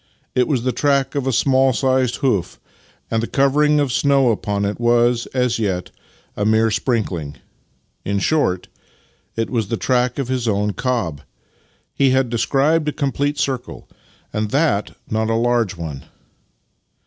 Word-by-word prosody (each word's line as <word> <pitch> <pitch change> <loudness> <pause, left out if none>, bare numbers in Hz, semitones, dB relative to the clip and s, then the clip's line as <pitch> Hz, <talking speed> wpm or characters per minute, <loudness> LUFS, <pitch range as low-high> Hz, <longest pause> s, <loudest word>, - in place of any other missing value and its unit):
It 125 - +2
was 130 -6 0
the 130 - +1
track 140 +1 +1
of 140 -3 -2
a - - +2
small 130 +1 +3
sized 130 -1 +1
hoof, 100 -10 0 0.5
and 115 -1 +1
the 115 - -2
covering 150 +2 +3
of 140 -4 0
snow 140 -3 +3
upon 100 -1 -1
it 100 +3 -3
was, 120 0 +2
as 125 -3 0
yet, 95 -5 -2 0.4
a 105 - -2
mere 110 +1 +3
sprinkling. 95 - -2 0.7
In 100 0 -1
short, 95 - 0 0.7
it 115 0 -2
was 115 -5 0
the 115 - -2
track 125 0 0
of 135 -3 -2
his 125 -2 -2
own 105 -1 0
cob! 95 - -2 0.7
He 135 -1 +3
had 130 -2 +1
described 145 +6 +1
a - - +1
complete 145 0 -1
circle, 130 -3 -3 0.5
and 105 0 -1
that 140 -6 0
not 110 0 -1
a 115 - +1
large 115 -4 +1
one. 80 -6 -7
120 Hz, 155 wpm, -20 LUFS, 105-135 Hz, 0.7 s, small